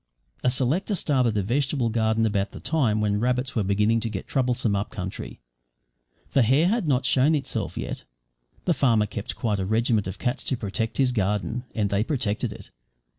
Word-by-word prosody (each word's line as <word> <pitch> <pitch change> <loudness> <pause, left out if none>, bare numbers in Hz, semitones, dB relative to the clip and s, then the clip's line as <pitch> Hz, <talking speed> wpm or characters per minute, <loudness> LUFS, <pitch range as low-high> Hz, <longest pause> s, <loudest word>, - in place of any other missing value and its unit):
A 125 - +4
selector 140 - +1
started 130 - +1
a 100 - +1
vegetable 130 +2 0
garden 110 0 +1
about 100 -2 0
the - - -8
time 120 -10 +1
when 105 -1 +1
rabbits 125 +2 0
were 115 - +2
beginning 105 +3 +2
to 115 - -3
get 95 -3 -5
troublesome 125 -5 +1
up 100 +2 -2
country. 95 -2 -6 0.9
The 135 - +4
hare 135 +8 +4
had 220 -5 0
not 135 -2 +2
shown 140 +4 +4
itself 145 - -3
yet. - - -4 0.6
The 175 - +3
farmer 115 -8 +3
kept 105 0 -5
quite 105 -4 -1
a 95 - -1
regiment 110 -1 +1
of 95 - -5
cats 125 +2 -2
to 130 - -1
protect 110 +1 -3
his 130 -2 +3
garden 105 +3 -1
and 105 -3 0
they 100 +1 +2
protected 120 -4 -1
it. - - -11
115 Hz, 185 wpm, -25 LUFS, 105-130 Hz, 0.9 s, A